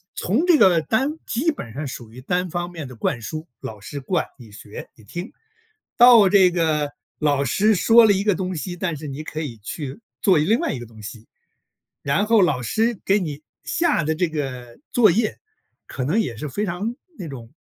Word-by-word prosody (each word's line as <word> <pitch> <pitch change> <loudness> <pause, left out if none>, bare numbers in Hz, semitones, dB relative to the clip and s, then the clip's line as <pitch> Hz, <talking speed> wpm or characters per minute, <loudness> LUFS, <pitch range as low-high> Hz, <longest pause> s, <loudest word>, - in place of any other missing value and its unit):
从 235 - 0
这 335 -4 +6
个 185 -7 +5
单 260 - 0 0.2
基 285 +9 +1
本 115 - -8
上 145 +3 -4
属 120 -3 -8
于 125 +2 -11
单 180 +5 -1
方 175 +1 -3
面 160 -6 -7
的 125 - -11
灌 115 +1 -2
输， 155 +6 -6
老 110 -1 -8
师 140 +8 -7
灌， 160 +5 -1
你 115 -4 -13
学、 105 0 -10
你 110 - -19
听， 175 - -7 0.7
到 235 -5 +8
这 190 -2 +6
个 155 -4 0 0.3
老 145 -2 +1
师 210 - +3
说 230 +5 +6
了 - - +5
一 195 0 +1
个 210 -2 +3
东 185 +1 -3
西， 175 +3 -4
但 170 -3 -3
是 150 +1 -8
你 140 +3 -6
可 155 - -6
以 135 -8 -5
去 135 - -7 0.2
做 185 -6 +4
另 205 +10 +3
外 - - -1
一 130 - -5
个 120 - -9
东 110 -2 -14
西。 110 +1 -9 0.7
然 145 +9 +1
后 225 -1 +4
老 145 -9 +1
师 225 - 0
给 200 +2 +3
你 155 -5 -5 0.2
下 330 - +1
的 160 +1 0
这 175 +1 0
个 125 -6 -5
作 220 -6 +5
业 215 +3 0 0.5
可 130 - -5
能 170 - +1
也 120 - -4
是 150 +4 -5
非 205 +11 -2
常 200 +6 -3 0.2
那 180 - -5
种， 125 -4 -10
165 Hz, 225 characters per minute, -22 LUFS, 135-200 Hz, 0.7 s, 到